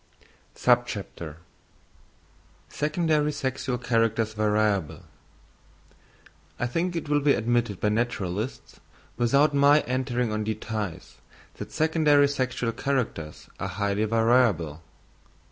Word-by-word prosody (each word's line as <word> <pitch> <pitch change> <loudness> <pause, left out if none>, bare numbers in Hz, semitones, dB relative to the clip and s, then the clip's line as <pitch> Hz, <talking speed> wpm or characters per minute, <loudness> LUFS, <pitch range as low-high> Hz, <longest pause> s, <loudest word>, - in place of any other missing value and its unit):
Secondary 105 -10 0 1.9
Sexual 130 -2 -2
Characters 115 -2 0
Variable.—I 105 +2 -5
think 170 +8 -1
it 165 - -3
will 145 0 +2
be 145 0 +3
admitted 120 -3 0
by 105 - +1
naturalists, 110 -1 -3 0.4
without 140 +5 +3
my 145 +1 +5
entering 125 -2 -1
on 110 0 -1
details, 105 -4 -5 0.4
that - - -7
secondary 155 -3 +3
sexual 130 -4 -1
characters 120 - -3
are 100 - -2
highly 100 +2 -1
variable. 110 - +2
115 Hz, 90 wpm, -26 LUFS, 105-135 Hz, 1.9 s, my